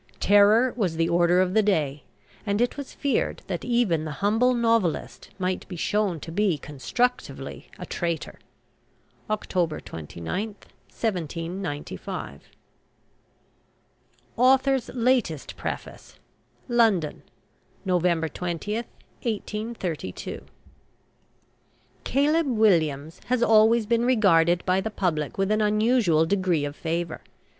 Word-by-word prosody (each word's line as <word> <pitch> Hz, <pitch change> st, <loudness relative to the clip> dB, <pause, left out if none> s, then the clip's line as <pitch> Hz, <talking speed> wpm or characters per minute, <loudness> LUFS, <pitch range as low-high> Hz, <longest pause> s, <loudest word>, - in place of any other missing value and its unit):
Terror 210 Hz, +5 st, +5 dB
was 190 Hz, -9 st, -1 dB
the 165 Hz, 0 st, +1 dB
order 175 Hz, +1 st, +3 dB
of 185 Hz, 0 st, 0 dB
the 220 Hz, -, +5 dB
day; 155 Hz, -9 st, 0 dB, 0.4 s
and 205 Hz, -1 st, -1 dB
it 245 Hz, +1 st, +1 dB
was 280 Hz, -2 st, -7 dB
feared 280 Hz, -4 st, -1 dB
that 175 Hz, -3 st, -4 dB
even 235 Hz, -10 st, +1 dB
the 155 Hz, -1 st, -5 dB
humble 220 Hz, -, +2 dB
novelist 230 Hz, -8 st, 0 dB
might 185 Hz, -1 st, -2 dB
be 180 Hz, -, -7 dB
shown 195 Hz, 0 st, 0 dB
to 165 Hz, -, -7 dB
be 190 Hz, -2 st, +1 dB
constructively 150 Hz, -, -3 dB
a -, -, -7 dB
traitor. 170 Hz, -3 st, -3 dB, 0.9 s
October 180 Hz, -6 st, -1 dB
29, 85 Hz, -, -5 dB, 0.4 s
1795. 165 Hz, -, -4 dB, 1.9 s
AUTHOR'S 265 Hz, +1 st, +3 dB
LATEST 235 Hz, -, 0 dB
PREFACE. -, -, -7 dB, 0.5 s
LONDON, 225 Hz, -, +2 dB, 0.6 s
November 175 Hz, -3 st, +1 dB
20, 175 Hz, +5 st, -4 dB
1832. 215 Hz, -, -5 dB, 1.6 s
"CALEB 295 Hz, +4 st, +2 dB
WILLIAMS" 165 Hz, -, +1 dB
has 250 Hz, -1 st, +1 dB
always 225 Hz, 0 st, +5 dB
been 235 Hz, +2 st, +1 dB
regarded 175 Hz, -8 st, +3 dB
by 185 Hz, +1 st, +2 dB
the 220 Hz, -, -3 dB
public 165 Hz, -8 st, -2 dB
with 195 Hz, +1 st, +1 dB
an 215 Hz, 0 st, +2 dB
unusual 210 Hz, -6 st, +3 dB
degree 180 Hz, -4 st, +1 dB
of 145 Hz, 0 st, -5 dB
favour. 165 Hz, 0 st, -3 dB
195 Hz, 105 wpm, -25 LUFS, 165-230 Hz, 1.9 s, Terror